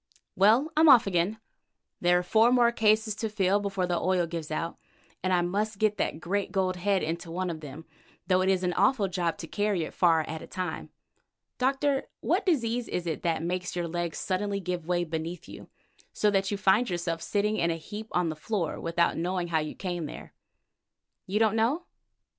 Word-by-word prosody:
Well, 230 +11 +4
I'm 315 0 +6
off 245 -3 +8
again. 195 +3 0 0.6
There 175 0 +4
are 180 - 0
four 220 +6 +4
more 240 -1 +5
cases 215 -1 +2
to 220 - -2
fill 200 -1 +2
before 195 -2 -1
the 175 -1 0
oil 185 -1 +2
gives 165 -2 -5
out, 165 +2 -3 0.4
and 185 - -1
I 180 -1 +3
must 205 +4 -1
get 210 0 +1
that - - -1
great 195 +4 -2
gold 185 -2 0
head 195 +1 +1
into 165 +2 -3
one 180 +1 -2
of 160 - -6
them, 150 +1 -9 0.4
though 185 -1 +3
it 190 - +2
is 190 -1 +2
an 180 -1 0
awful 205 +2 +2
job 175 -3 -1
to 165 - -7
carry 205 -3 0
it - - -7
far 165 -3 +4
at 160 0 -6
a - - -10
time. 180 -4 -5 0.7
Doctor, 270 +1 +1
what 375 +4 0
disease 245 -7 +1
is 180 - -3
it 160 -3 -3
that 165 -1 -1
makes 180 +1 -3
your 175 -1 -2
legs 170 -1 -3
suddenly 200 +1 -1
give 180 -3 -4
way 175 -1 +1
beneath 165 +1 -5
you, - - -11 0.4
so 210 - +2
that 195 -1 +1
you 205 - -2
find 200 +5 +3
yourself 170 -2 -2
sitting 210 +1 0
in 170 - +1
a 165 - 0
heap 210 +7 -8
on 180 -2 +1
the 155 - -4
floor 175 +1 -3
without 170 +1 +1
knowing 175 +1 -2
how 160 -2 +2
you 155 0 -4
came 175 -4 -4
there? - - -10 0.9
You 195 +3 -1
don't 220 -1 +3
know? 245 +10 +1
185 Hz, 205 wpm, -28 LUFS, 170-215 Hz, 0.9 s, off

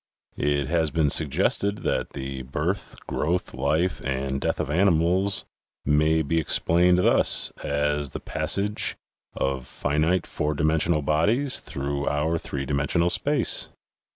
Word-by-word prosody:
It 70 -1 0
has 80 +2 0
been 75 -2 +1
suggested 90 +7 0
that - - -2
the 65 0 -5
birth, 75 +9 -3
growth, 90 +4 -2
life, 75 +8 0
and 70 0 -2
death - - -1
of 75 - -2
animals, 90 +3 +3 0.4
may 75 +2 +2
be 80 +3 0
explained 90 +3 +3
thus 90 - +5
as 75 0 -1
the - - -6
passage 105 +2 -2 0.4
of 65 -2 -2
finite 80 +5 0
four 75 0 -2
dimensional 75 +1 +1
bodies 105 - +1
through 70 +1 -4
our 80 +3 0
three 70 -3 -5
dimensional 75 +5 0
space." - - 0
75 Hz, 125 wpm, -24 LUFS, 70-85 Hz, 0.4 s, thus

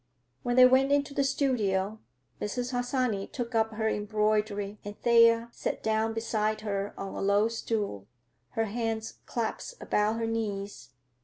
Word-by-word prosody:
When 245 0 -1
they 255 0 +9
went 260 +2 +5
into 285 0 +2
the 280 - +1
studio 220 -7 0 0.4
Mrs. 245 +4 -2
Harsanyi 245 -5 0
took 245 -2 -5
up 220 -1 +1
her 220 0 0
embroidery 210 -1 0
and 205 0 -8
Thea 230 0 +5
sat - - -4
down 220 0 +1
beside 215 -1 -1
her 200 -1 -3
on 195 0 -5
a - - -4
low 200 +2 +3
stool, 210 - -3 0.5
her 225 - +2
hands 225 0 -3
clasped 240 - -3
about 210 +1 +1
her 230 0 -1
knees. 205 - -3
220 Hz, 150 wpm, -29 LUFS, 210-235 Hz, 0.5 s, they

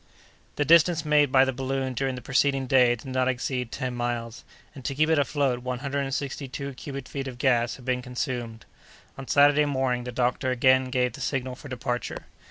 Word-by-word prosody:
The 145 - 0
distance 165 +1 +5
made 150 -2 +3
by 130 0 +6
the 130 - -1
balloon 135 0 -2
during 135 +1 -1
the 125 - -8
preceding 135 +1 +1
day 125 -2 +4
did 115 - -15
not 130 0 +1
exceed 125 -1 -2
ten 130 -1 -3
miles, 120 -1 -4 0.3
and, 135 -3 -11
to 135 - -3
keep 155 +3 +2
it 160 - +4
afloat, 140 -3 0
one 125 0 -4
hundred 140 +2 -3
and 135 -1 -2
sixty 140 0 -3
two 140 +1 -6
cubic 135 0 -7
feet 135 -1 -5
of 125 -2 -7
gas 120 -3 +2
had 125 - -14
been 125 -1 0
consumed. 120 -3 -4 0.5
On 135 -1 -9
Saturday 145 +1 +5
morning 130 -3 0
the 125 - -4
doctor 125 +1 0
again 130 +1 +4
gave 125 -2 0
the - - -9
signal 130 -2 -2
for 140 +3 -11
departure. 125 -1 -4
130 Hz, 205 wpm, -26 LUFS, 125-140 Hz, 0.5 s, by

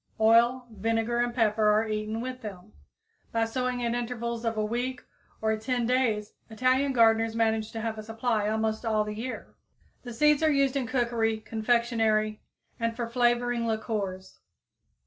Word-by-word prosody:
Oil, 235 +3 +4
vinegar 225 +3 -1
and 240 0 +1
pepper 220 -3 +2
are 215 +1 +3
eaten 215 +1 -3
with 255 +1 -5
them. 195 -5 -9 0.6
By 230 0 +1
sowing 250 +1 -2
at 235 - 0
intervals 235 -1 -3
of 225 -1 -1
a 215 - +1
week 245 +3 -3 0.4
or 220 0 +2
10 240 +2 -1
days 225 -4 0 0.2
Italian 255 +5 +2
gardeners 225 -2 +3
manage 220 -1 +1
to 225 - -4
have 220 -1 -3
a - - -6
supply 225 -1 -1
almost 220 +1 -1
all 215 -2 +1
the 210 0 -5
year. 235 +4 -6 0.5
The 245 - -8
seeds 300 +5 +3
are 315 - +4
used 275 -2 +2
in 265 -3 -1
cookery, 235 -3 0
confectionery 220 -1 0 0.4
and 230 0 -1
for 235 -1 -3
flavoring 240 0 +1
liquors. 205 -4 -3
230 Hz, 160 wpm, -28 LUFS, 220-245 Hz, 0.6 s, Oil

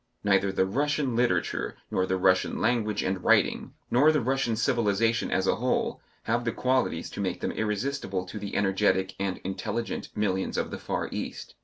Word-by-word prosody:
Neither 100 -1 +3
the 95 - +2
Russian 140 +4 0
literature 120 +1 0 0.2
nor 95 0 +1
the 95 - +1
Russian 90 0 +2
language 110 -4 +1
and 95 -1 -2
writing, - - +2 0.2
nor 145 +6 +6
the 155 - +2
Russian 130 -2 0
civilization 115 -1 +1
as 95 - +1
a - - +2
whole 125 +2 0 0.2
have 120 +2 0
the 115 - 0
qualities 125 -9 0
to - - -5
make 95 -3 -2
them - - -2
irresistible 105 -3 -2
to 105 +4 -7
the 100 -1 -5
energetic 95 -1 +2
and 95 -1 -1
intelligent 115 +5 -3
millions 95 -3 -1
of - - -1
the - - -5
far - - -2
East. - - -5
105 Hz, 175 wpm, -27 LUFS, 95-120 Hz, 0.2 s, nor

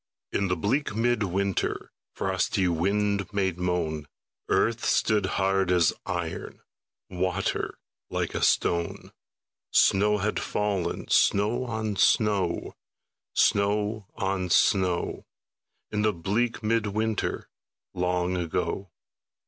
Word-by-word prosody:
In 100 - 0
the 90 - +1
bleak 105 - -1
mid 120 0 +1
winter 100 0 -1 0.2
Frosty 95 -2 0
wind 100 +3 0
made 95 -3 -1
moan, 85 -4 -1 0.4
Earth 115 +1 +2
stood 105 -4 +2
hard 95 -1 +2
as 90 -3 +4
iron, 85 -2 -4 0.5
Water 95 +1 -1 0.3
like - - -2
a - - -2
stone; 85 -1 +1 0.6
Snow 105 +2 +4
had 105 +2 -1
fallen, 105 -4 -2
snow 105 +5 +3
on 110 -3 -3
snow, 100 -3 +2 0.6
Snow 105 +1 +2
on 95 -3 -1
snow, 90 -1 +2 0.6
In 105 - 0
the 110 0 +2
bleak 105 +8 -1
mid 110 0 +1
winter 110 +1 -2 0.5
Long 90 0 0
ago. 90 +3 -2
100 Hz, 105 wpm, -27 LUFS, 90-105 Hz, 0.6 s, as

